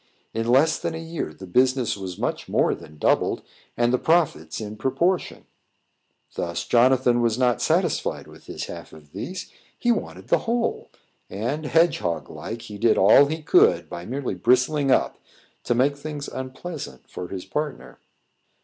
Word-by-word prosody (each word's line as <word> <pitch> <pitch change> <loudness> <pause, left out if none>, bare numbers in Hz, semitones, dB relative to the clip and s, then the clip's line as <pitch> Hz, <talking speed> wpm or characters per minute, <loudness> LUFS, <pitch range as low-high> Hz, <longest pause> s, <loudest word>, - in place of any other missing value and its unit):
In 115 +1 -2
less 135 +6 +4
than 160 - -3
a - - -4
year, 165 - -5
the 95 +5 -11
business 130 +5 +2
was 95 -3 -6
much - - -3
more - - +2
than 75 0 -11
doubled, - - +1 0.3
and 120 +1 +2
the 125 - +2
profits 160 - +1
in 105 -1 -6
proportion; 135 - -1 0.9
thut 85 -1 -3
Jonathan 125 0 +4
was 115 -1 +1
not 125 -2 +2
satisfied - - 0
with - - -16
his - - -5
half - - -9
of 75 -2 -15
these 185 - -6 0.3
he 240 - +2
wanted - - -4
the - - +4
whole; 235 0 -1 0.4
and, 130 +10 -3
hedge 165 +2 +3
hog 85 -5 -3
like, 115 +1 -7
he 105 -3 -9
did 115 -1 +3
all 110 +9 +7
he 160 +2 -4
could, - - +4
by 85 - -6
merely 130 +5 -3
bristling 130 - +2
up, 130 - +2 0.5
to 120 - +1
make 135 +4 +2
things 145 0 -6
unpleasant 130 - -7
for 90 - -7
his 95 0 -6
partner. 150 -2 -5
125 Hz, 165 wpm, -24 LUFS, 105-150 Hz, 0.9 s, all